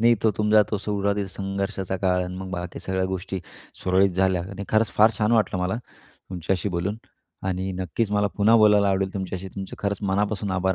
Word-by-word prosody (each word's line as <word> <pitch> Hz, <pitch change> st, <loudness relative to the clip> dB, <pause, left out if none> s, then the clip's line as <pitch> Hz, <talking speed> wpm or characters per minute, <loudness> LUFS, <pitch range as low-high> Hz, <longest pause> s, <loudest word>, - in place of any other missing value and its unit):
नाही, 120 Hz, +1 st, +6 dB
तो 110 Hz, -, +4 dB
तुमचा 105 Hz, 0 st, +5 dB
तो 105 Hz, -, +1 dB
सुरुवातीचा 100 Hz, -1 st, -1 dB
संघर्षाचा 95 Hz, -1 st, -3 dB
काळ 95 Hz, -1 st, +1 dB
आहे, 90 Hz, -, -1 dB
मग 95 Hz, 0 st, -6 dB
बाकी 90 Hz, -1 st, -5 dB
सगळ्या 95 Hz, 0 st, -1 dB
गोष्टी 95 Hz, 0 st, -4 dB, 0.4 s
सुरळीत 95 Hz, +1 st, +3 dB
झाल्या 95 Hz, -1 st, +1 dB
आणि 100 Hz, 0 st, -6 dB
खरंच 110 Hz, 0 st, +2 dB
फार 110 Hz, +2 st, +7 dB
छान 105 Hz, +1 st, +2 dB
वाटलं 105 Hz, -5 st, +2 dB
मला 90 Hz, +3 st, 0 dB
तुमच्याशी 90 Hz, +1 st, -4 dB
बोलून 95 Hz, +5 st, -1 dB, 0.5 s
आणि 95 Hz, +1 st, -2 dB
नक्कीच 95 Hz, +5 st, -1 dB
मला 105 Hz, 0 st, +3 dB
पुन्हा 110 Hz, +3 st, +5 dB
बोलायला 105 Hz, -2 st, +5 dB
आवडेल 95 Hz, 0 st, 0 dB
तुमच्याशी. 95 Hz, -1 st, -4 dB
तुमचे 95 Hz, 0 st, -7 dB
खरंच 100 Hz, 0 st, -1 dB
मनापासून 100 Hz, 0 st, 0 dB
आभार 95 Hz, +1 st, +1 dB
95 Hz, 185 wpm, -24 LUFS, 95-105 Hz, 0.5 s, फार